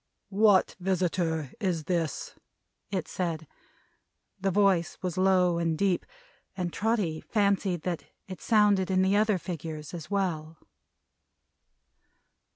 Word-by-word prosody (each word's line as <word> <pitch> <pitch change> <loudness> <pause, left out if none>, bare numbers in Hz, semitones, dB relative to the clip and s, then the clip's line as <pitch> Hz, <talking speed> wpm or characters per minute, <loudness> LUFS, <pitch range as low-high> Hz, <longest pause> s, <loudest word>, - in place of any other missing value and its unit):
"What 205 -1 +4
visitor 175 -5 0
is 180 -7 -1
this?" 165 -2 -2 0.6
it 190 -4 -2
said. 165 -3 -3 0.9
The 195 +1 0
voice 190 -3 +2
was 180 -2 -2
low 185 -2 +3
and 165 -2 0
deep, 190 -1 +1 0.5
and 180 -2 -2
Trotty 205 -8 0
fancied 200 -5 +1
that 175 -3 -3 0.2
it 185 -1 -8
sounded 205 -4 +3
in 185 0 +3
the 190 +1 +3
other 210 -1 +3
figures 160 -3 -6
as 165 -2 -7
well. 165 -6 -2
185 Hz, 115 wpm, -28 LUFS, 165-195 Hz, 0.9 s, What